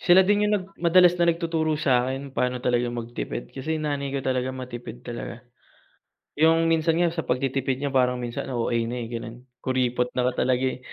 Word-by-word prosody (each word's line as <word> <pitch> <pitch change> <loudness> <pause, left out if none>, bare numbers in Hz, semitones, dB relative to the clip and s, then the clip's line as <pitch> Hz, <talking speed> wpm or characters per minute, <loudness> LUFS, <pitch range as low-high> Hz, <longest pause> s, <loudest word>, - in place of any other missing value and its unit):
Sila 185 +1 +6
din 205 +2 +3
yung - - +1
nag 185 - -5 0.2
madalas 175 +1 +6
na 170 - +4
nagtuturo 165 -2 0
sa 130 -5 +2
akin 135 +1 -5
pa'no 125 -1 0
talaga 120 -1 +2
magtipid. 120 0 -5
Kasi 155 +4 -3
nanay 145 -2 -2
ko, 140 - -1
talaga 130 -1 0
matipid 120 -2 -7
talaga. 120 0 -6 1.0
Yung, 165 +1 +4
minsan 165 0 +2
nga 175 -1 +3
sa 165 -1 -4
pagtitipid 130 0 0
niya 140 0 -2
parang 125 -1 +3
minsan 120 -1 -4
OA 120 0 0
na, 120 - -3
eh, - - -6
gano'n. 115 -1 -5 0.2
Kuripot 125 -1 0
na 125 - +1
nga 125 - 0
talaga, 125 0 +1
eh. 130 -1 -1
130 Hz, 190 wpm, -25 LUFS, 125-160 Hz, 1.0 s, Sila